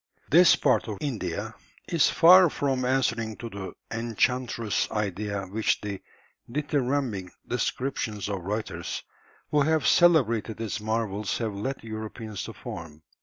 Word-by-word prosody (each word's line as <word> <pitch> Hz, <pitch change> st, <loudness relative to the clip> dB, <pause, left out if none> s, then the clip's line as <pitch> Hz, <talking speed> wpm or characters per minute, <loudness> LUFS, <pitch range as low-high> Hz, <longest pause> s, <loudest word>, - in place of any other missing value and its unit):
] -, -, -34 dB
This 180 Hz, -1 st, +8 dB
part -, -, +2 dB
of 105 Hz, -2 st, -4 dB
India 110 Hz, -, -3 dB, 0.3 s
is 170 Hz, -4 st, +3 dB
far 180 Hz, +1 st, +7 dB
from 135 Hz, -3 st, -1 dB
answering 115 Hz, -4 st, 0 dB
to 115 Hz, -1 st, -7 dB
the 95 Hz, -1 st, -6 dB, 0.2 s
"enchantress" 115 Hz, 0 st, 0 dB
idea 100 Hz, -1 st, -2 dB
which 105 Hz, +4 st, 0 dB
the 100 Hz, -2 st, -5 dB, 0.5 s
dithyrambic 135 Hz, -, -1 dB, 0.2 s
descriptions 125 Hz, -5 st, -2 dB
of 100 Hz, -2 st, -3 dB
writers 105 Hz, +5 st, -4 dB, 0.5 s
who 150 Hz, -, +3 dB
have 155 Hz, -1 st, +2 dB
celebrated 120 Hz, -11 st, +4 dB
its 110 Hz, -1 st, -3 dB
marvels 110 Hz, -2 st, -1 dB
have 110 Hz, -3 st, -2 dB
led 130 Hz, +7 st, -4 dB
Europeans 110 Hz, -1 st, -6 dB
to 115 Hz, -, -7 dB
form. 85 Hz, -9 st, -9 dB
115 Hz, 130 wpm, -27 LUFS, 105-130 Hz, 0.5 s, This